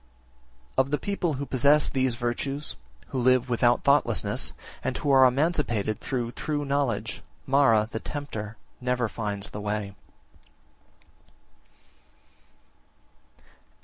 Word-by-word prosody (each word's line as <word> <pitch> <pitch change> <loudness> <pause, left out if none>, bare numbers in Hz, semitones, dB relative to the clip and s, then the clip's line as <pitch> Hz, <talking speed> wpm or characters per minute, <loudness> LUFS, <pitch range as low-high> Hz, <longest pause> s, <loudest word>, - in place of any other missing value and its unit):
57. - - +4
Of 130 +1 +3
the 150 - +1
people 185 -4 -1
who 140 +1 -4
possess 140 +3 +3
these 130 -3 0
virtues, 135 +4 -2 0.3
who 130 - -2
live 130 0 +3
without 120 0 +3
thoughtlessness, 140 +1 +2 0.3
and - - -2
who 145 - 0
are 135 -1 +7
emancipated 125 - 0
through 120 -3 -3
true 145 +2 -3
knowledge, 140 -6 -1 0.2
Mara, 125 -6 +4
the 110 - -3
tempter, 110 -8 -5 0.2
never 125 -1 0
finds 105 -2 -3
the 105 - -6
way. 105 -1 -3
130 Hz, 115 wpm, -26 LUFS, 115-140 Hz, 0.3 s, are